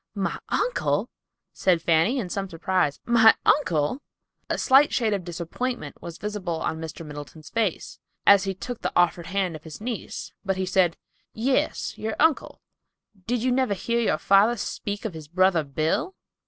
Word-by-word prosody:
"My 195 -1 -2
uncle!" - - 0 0.4
said 180 -3 +2
Fanny, 165 +10 +2
in 225 -8 -2
some 195 +1 -3
surprise. 170 -3 0
"My 225 -2 +6
uncle!" 175 - +2 0.5
A - - 0
slight 275 +2 +5
shade 225 -4 +1
of 195 -3 -2
disappointment 175 +9 -5
was 170 -1 -8
visible 195 -6 -3
on 160 0 -3
Mr. 160 0 -7
Middleton's 150 +1 -10
face, 220 -7 -2 0.3
as 200 0 +7
he 195 -1 -2
took 245 +5 -6
the - - -1
offered 175 -1 +2
hand 185 -2 -1
of 155 - -10
his 160 -2 -9
niece, 230 +1 -5
but 195 -1 -1
he 190 - -1
said, 185 -2 +2 0.4
"Yes, 255 +4 -1
your 220 0 -3
uncle. 320 -1 +1 0.7
Did 240 0 0
you 255 - +2
never 255 -5 +1
hear 235 +5 -1
your 235 - +1
father 205 +5 +4
speak 205 +1 -4
of 215 - -3
his 155 -2 -9
brother 180 0 +3
Bill?" 155 - -1
195 Hz, 170 wpm, -25 LUFS, 165-230 Hz, 0.7 s, as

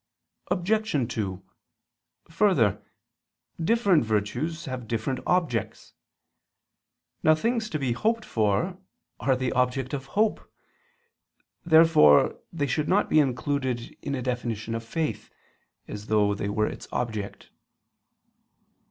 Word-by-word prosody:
Obj. 180 - 0
2: 95 -4 -3 0.9
Further, 165 - +2 0.8
different 200 - +3
virtues 120 +10 -2
have 130 -3 -6
different 120 +4 -2
objects. 170 -10 -1 1.3
Now 155 - +5
things 225 +5 -1
to 155 - -2
be 135 -4 -1
hoped 225 - 0
for 110 - 0 0.4
are 135 - +2
the 130 -1 -1
object 125 +1 0
of 135 -1 -4
hope. 220 0 +1 1.1
Therefore 160 - +5
they 150 -4 -1
should 150 +3 -1
not 200 +3 +2
be 155 - +6
included 130 -3 -1
in 140 - -3
a 130 - -4
definition 115 -3 -3
of 115 0 -3
faith, 155 +6 -3 0.6
as 105 +1 -8
though 105 -1 +3
they 100 0 -3
were 105 +1 +1
its - - -6
object. 110 -4 -4
130 Hz, 115 wpm, -26 LUFS, 115-165 Hz, 1.3 s, be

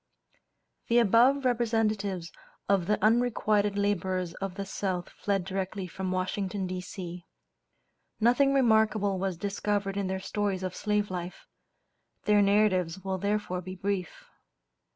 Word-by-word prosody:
The 235 - +3
above 240 +5 +4
representatives 215 -7 0 0.4
of 195 -3 +2
the 210 - +2
unrequited 215 -3 +2
laborers 185 -3 0
of 195 0 -5
the 200 0 -4
South 185 -2 -3
fled 195 -3 -2
directly 190 0 -3
from 185 +1 -4
Washington, 190 +1 -2
D.C. 180 -1 -6 1.0
Nothing 245 +5 +4
remarkable 220 -5 +3
was 190 -2 -2
discovered 200 +1 -2
in 200 -1 -1
their 190 0 -2
stories 195 -1 -2
of 185 -1 -3
slave 210 -1 0
life; 180 0 -6 0.8
their 210 -1 +4
narratives 195 -3 +2
will 190 -1 -2
therefore 200 -2 -1
be 185 +1 -7
brief. 190 -2 -3
200 Hz, 125 wpm, -28 LUFS, 185-210 Hz, 1.0 s, above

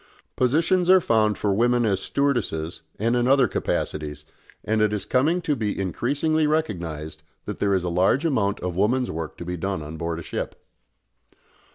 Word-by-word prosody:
Positions 165 +8 +2
are 190 0 +8
found 110 - +2
for 100 -2 0
women 120 +3 +2
as 100 -3 +1
stewardesses 105 - -1 0.2
and 115 +3 +1
in 120 0 +2
other 135 -1 +5
capacities, 75 -1 -3 0.4
and 110 +1 +1
it 105 -1 +2
is 105 - -2
coming 160 +8 +1
to 150 - +1
be 105 -6 -2
increasingly 145 - 0
recognised 85 - -2 0.2
that - - -5
there 100 -1 +2
is 95 - 0
a - - -2
large 95 - +2
amount 110 -10 +1
of 90 -1 -3
women's 120 +7 +1
work 80 0 -5
to 85 - -7
be 90 +1 -4
done 95 -1 -3
on 75 +2 -7
board 85 0 -3
a 85 - -6
ship. - - -4
105 Hz, 180 wpm, -24 LUFS, 90-135 Hz, 0.4 s, are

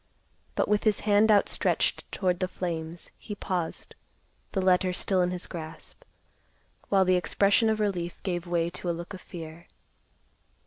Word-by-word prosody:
But - - +1
with 210 0 +2
his 215 -3 +2
hand 210 +1 +4
outstretched 205 -1 +2
toward 180 -2 0
the 185 - +1
flames, 170 -2 -5
he 210 - -6
paused, 180 -4 -3 0.6
the 195 - -1
letter 185 0 +3
still 185 +1 +1
in 180 - +2
his 180 0 -4
grasp, 160 - -8 0.9
while 195 -1 +4
the 185 0 +4
expression 200 +5 +3
of 220 0 +1
relief 180 -5 -1
gave 175 -2 -2
way 170 -1 0
to 180 0 -4
a 170 - -1
look 175 +3 -7
of 185 - -8
fear. 165 -1 -9
180 Hz, 160 wpm, -28 LUFS, 175-200 Hz, 0.9 s, hand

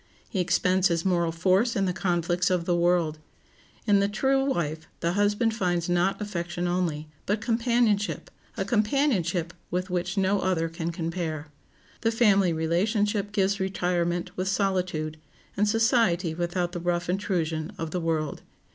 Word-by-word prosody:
He 195 - -3
expends 180 +1 +3
his 170 -2 -1
moral 170 -3 +2
force 190 +8 +2
in 195 -3 +1
the 180 - 0
conflicts 175 0 0
of 180 -2 0
the 175 - +2
world. 170 -3 +2 0.7
In 205 -2 +4
the 200 - +2
true 265 +6 +1
wife 160 - -2
the 170 - 0
husband 205 +3 +2
finds 175 -5 0
not 175 +2 +1
affection 175 -3 -3
only, 170 -4 -1 0.2
but 205 +2 +1
companionship—a 230 -2 -1
companionship 210 - +1 0.2
with 180 +1 -2
which 180 +2 -2
no 195 +1 +2
other 165 -3 0
can 165 +1 -4
compare. 165 -3 -4 0.5
The 225 - +2
family 200 -6 +4
relationship 205 +6 0
gives 200 -1 +1
retirement 175 -1 -1
with 185 +1 -2
solitude, 185 -6 -1 0.4
and 210 +1 +2
society 225 - +2
without 175 +1 -1
the 175 - -4
rough 175 0 -1
intrusion 170 -3 -1
of 165 -2 -4
the 180 - -2
world. 160 -2 -1
180 Hz, 145 wpm, -26 LUFS, 170-205 Hz, 0.7 s, In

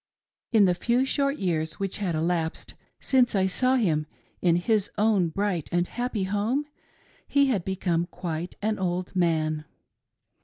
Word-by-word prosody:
In 220 -4 +6
the 180 - +3
few 240 +8 +1
short 275 +1 0
years 160 -4 -1
which 195 -1 -3
had 185 -5 -1
elapsed 165 0 -1 0.3
since 250 -4 +2
I 190 -1 +3
saw 255 +7 +2
him 160 -11 +1 0.3
in 170 -2 +4
his 205 +3 +1
own 205 -5 +3
bright 185 -2 -2
and 175 0 +1
happy 240 -4 -2
home, 210 +9 0 0.6
he 280 -1 +3
had 205 -9 0
become 175 -2 -1
quite 175 -1 -5
an 215 -1 0
old 180 0 -2
man. 155 -3 +1
190 Hz, 150 wpm, -26 LUFS, 170-220 Hz, 0.6 s, In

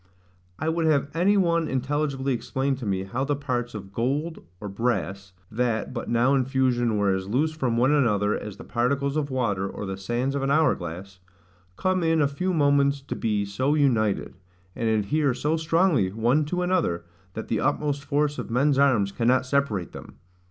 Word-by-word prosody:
I 155 - -3
would 160 0 +1
have 145 -2 +1
any 185 +5 +3
one 170 -3 +2
intelligibly 135 0 -1
explain 135 +3 -1
to 125 -5 -6
me 95 -1 -1
how 120 +7 -3
the 145 +1 0
parts 125 -4 -3
of 100 -2 -8
gold, 145 +9 -1 0.2
or 105 - -6
brass, 100 -2 -2 0.2
(that 115 +1 -1
but 120 - -5
now 120 +3 +3
in 135 -2 +3
fusion 125 -4 +1
were 100 -1 +2
as 95 0 -3
loose 145 +8 +1
from 130 -7 -1
one 130 +4 +3
another 105 -8 +2
as 105 -2 -7
the - - -10
particles 140 +4 0
of 150 -2 -1
water, 105 -7 -1
or 105 - -6
the 95 -1 -4
sands 120 +7 -2
of 140 - -2
an 135 - -1
hour 155 +2 +4
glass,) 90 +3 -8 0.6
come 185 0 +1
in 165 -1 +2
a 145 - +4
few 180 +7 -2
moments 140 -3 +3
to 135 - -6
be 105 -2 -1
so 130 +9 0
united, 115 -9 +1 0.4
and 115 -1 -1
adhere 120 +6 +1
so 150 +5 0
strongly 165 - +2
one 120 +8 +1
to 180 +4 -2
another, 170 - 0 0.3
that 110 - -5
the 110 - 0
utmost 145 0 0
force 145 0 0
of - - -5
men's 135 +4 +2
arms 115 -8 +3
cannot 125 +4 +2
separate 130 -9 0
them? - - -11
130 Hz, 190 wpm, -25 LUFS, 110-145 Hz, 0.6 s, hour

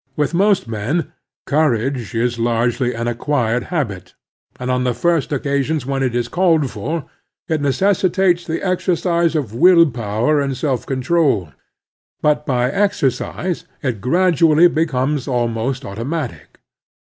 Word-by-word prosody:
With 150 +2 -1
most 195 - +2
men 115 +10 -2 0.3
^courage 135 -5 0
is 120 0 -1
largely 120 +2 0
an 115 +1 -3
acquired 120 -1 -1
habit, 100 - -4 0.4
and 125 0 -2
on 125 0 0
the 125 -2 0
first 165 +4 0
occasions 140 +1 -1
when 135 0 -2
it 125 -3 0
is 120 -1 0
called 165 -4 +2
for 145 +9 -4 0.4
it 160 -4 -1
necessitates 185 +3 +2
the 165 0 -3
exercise 170 -2 +1
of 135 -9 -2
will 170 +7 +6
power 115 +6 0
and 135 -2 -2
self 130 -2 -2
control; 135 - +1 0.7
but 150 0 +1
by 125 -1 +1
exercise 180 - -1 0.2
it 120 -7 -2
gradually 165 +2 +4
becomes 150 -4 -1
almost 125 +1 -1
automatic. 115 - -5
135 Hz, 130 wpm, -19 LUFS, 120-165 Hz, 0.7 s, will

